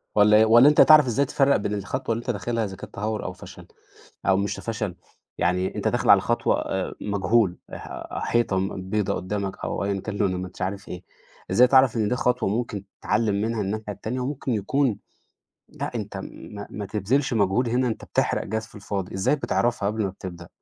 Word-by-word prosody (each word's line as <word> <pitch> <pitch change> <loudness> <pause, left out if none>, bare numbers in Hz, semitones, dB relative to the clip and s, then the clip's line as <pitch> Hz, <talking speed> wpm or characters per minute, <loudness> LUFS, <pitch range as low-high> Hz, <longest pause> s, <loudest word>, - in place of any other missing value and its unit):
والّا 105 0 +6
إيه؟ 110 - +6
والّا 120 +5 +7
أنت 150 - +2
هتعرف 155 -2 +8
إزاي 125 +3 +1
تفرق 140 +1 +3
بين 105 0 -1
الخطوة 115 +5 -2
اللي 115 - -3
أنت 125 - -8
داخلها 115 +1 -1
إذا 95 - -6
كانت - - -11
تهور 105 +1 -3
أو 90 - -4
فشل؟ 90 - -12 0.6
أو 95 -1 +4
مش 100 0 -2
فشل، 110 -6 -4 0.4
يعني 90 +1 0
أنت - - -1
داخل - - 0
على - - +8
خطوة - - +1
آآ 95 -1 -3
مجهول، 100 -1 +1 0.2
ح - - -7 0.2
حيطة 115 -5 +1
م 95 -1 -4
بيضة 105 -1 0
قدامك 100 +1 -3
أو - - -2
أيًا 100 0 -1
كان 105 -2 -5
لونها 95 -3 +1
ما 95 - -4
أنتش - - -13
عارف 100 +2 -3
إيه. 90 - -7 0.5
إزاي 125 +1 +6
تعرف 130 -1 +5
إن 110 -2 +1
دي 125 - +1
خطوة 125 -5 +1
ممكن 105 -2 -2 0.2
تتعلم 105 -1 +1
منها 110 0 -1
الناحية 105 +2 -3
التانية 120 +6 -4
وممكن 130 -1 -2
يكون 115 +3 0 0.7
لأ، - - -6
أنت - - -5
ما 100 -1 -8
ما 105 -1 -5
تبذلش 115 +6 0
مجهود 105 +4 +2
هنا 125 +2 +1
أنت 110 - -4
بتحرق - - 0
جاز 110 +2 -3
في - - -21
الفاضي، 100 -3 -5
إزاي 95 +10 +1
بتعرفها 120 -6 0
قبل 110 +1 -1
ما 95 - -1
بتبدأ؟ 85 -2 -9
105 Hz, 200 wpm, -24 LUFS, 95-120 Hz, 0.7 s, هتعرف